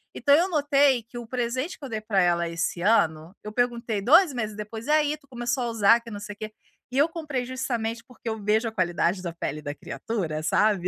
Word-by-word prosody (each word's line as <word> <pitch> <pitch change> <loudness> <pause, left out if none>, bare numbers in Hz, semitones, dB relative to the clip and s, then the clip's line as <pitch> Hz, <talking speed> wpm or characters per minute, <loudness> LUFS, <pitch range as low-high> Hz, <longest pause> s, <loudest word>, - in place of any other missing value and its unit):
Então 285 - +3
eu 355 +4 +3
notei 285 -5 +3
que 240 +2 -11
o 235 -2 -7
presente 255 +6 -2
que 280 - -9
eu - - -7
dei 220 -1 -3
para 210 -2 0
ela 170 -1 +2
esse 170 +1 -2
ano, 170 -4 +2
eu 210 - -6
perguntei 235 -3 0
2 315 - +6
meses 215 -4 -3
depois: 215 +3 -7
"Aí, 300 0 +3
tu 280 - -27
começou 240 0 -2
a - - -1
usar? 230 +1 +4
Que 230 - -11
não 205 - -6
sei 210 0 -7
o - - -42
quê", 215 0 -5 0.4
e 260 - -3
eu 290 +3 +5
comprei 295 -7 -3
justamente 240 -3 -3
porque 245 -2 -13
eu 220 -2 -4
vejo 220 +3 +2
a - - -3
qualidade 180 -2 0
da 175 -2 -4
pele 155 -2 -4
da 145 -1 -5
criatura, 165 -9 -4
sabe. 195 +2 +2
230 Hz, 230 wpm, -26 LUFS, 200-255 Hz, 0.4 s, 2